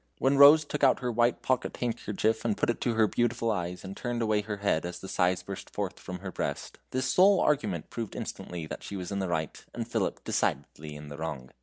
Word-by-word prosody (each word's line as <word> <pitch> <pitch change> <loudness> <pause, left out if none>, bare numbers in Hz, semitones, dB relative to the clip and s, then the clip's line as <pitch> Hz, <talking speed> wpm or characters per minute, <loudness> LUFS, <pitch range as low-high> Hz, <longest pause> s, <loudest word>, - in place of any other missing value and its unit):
When 135 +1 +2
Rose 145 +2 +9
took 145 0 -4
out 130 -1 +5
her 125 -1 -1
white 120 +1 +2
pocket 130 -1 0
handkerchief, 110 -2 -1
put - - +2
it - - -7
to 120 -2 0
her 110 -1 +5
beautiful 115 +1 0
eyes, 90 -3 -3
and 95 0 -7
turned 120 -1 -2
away 110 -1 +2
her 105 0 -5
head 100 -5 +1
as 90 0 -5
the 95 - -9
sighs 90 -1 +1
burst 100 +1 -7
forth - - -4
from 90 -1 -7
her 95 -1 -5
breast, - - -4
this 130 +1 -1
sole 190 +7 +5
argument 105 - 0
proved 115 -3 -5
instantly 85 -2 -5
that - - -7
she 100 - -7
was 90 -1 -5
in 100 - -1
the 95 -2 -2
right, 80 -2 -2
and - - -3
Philip - - -2
decidedly 75 0 -2
in 75 0 -9
the 75 - -8
wrong. 70 -6 -5
105 Hz, 225 wpm, -29 LUFS, 90-120 Hz, -, Rose